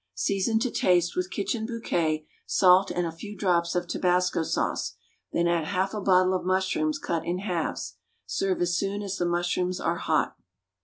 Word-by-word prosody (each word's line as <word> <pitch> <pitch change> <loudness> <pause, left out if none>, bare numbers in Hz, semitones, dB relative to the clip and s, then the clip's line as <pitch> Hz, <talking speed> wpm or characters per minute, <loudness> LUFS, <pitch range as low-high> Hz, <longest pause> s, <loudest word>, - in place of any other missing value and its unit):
Season 195 - +1
to 240 +2 0
taste 175 -1 +2
with 180 0 -1
Kitchen 220 +3 -2
Bouquet, 165 -10 -1 0.2
salt, 185 +1 +5
and 175 0 -1
a 165 - -2
few 205 +5 -9
drops 175 -3 +1
of 175 0 0
tabasco 180 -1 +1
sauce, 160 - -1 0.4
then 170 0 +1
add 170 -2 +1
half 190 +3 -1
a 210 - -3
bottle 185 -1 +4
of 185 - -1
mushrooms, 190 - +1
cut 170 - -2
in 175 +2 -2
halves. 180 -4 -3 0.3
Serve 190 -2 -1
as 175 0 0
soon 200 +2 -1
as 195 -1 -3
the 175 - 0
mushrooms 175 +1 0
are 170 +1 0
hot. - - 0
180 Hz, 175 wpm, -27 LUFS, 175-195 Hz, 0.4 s, salt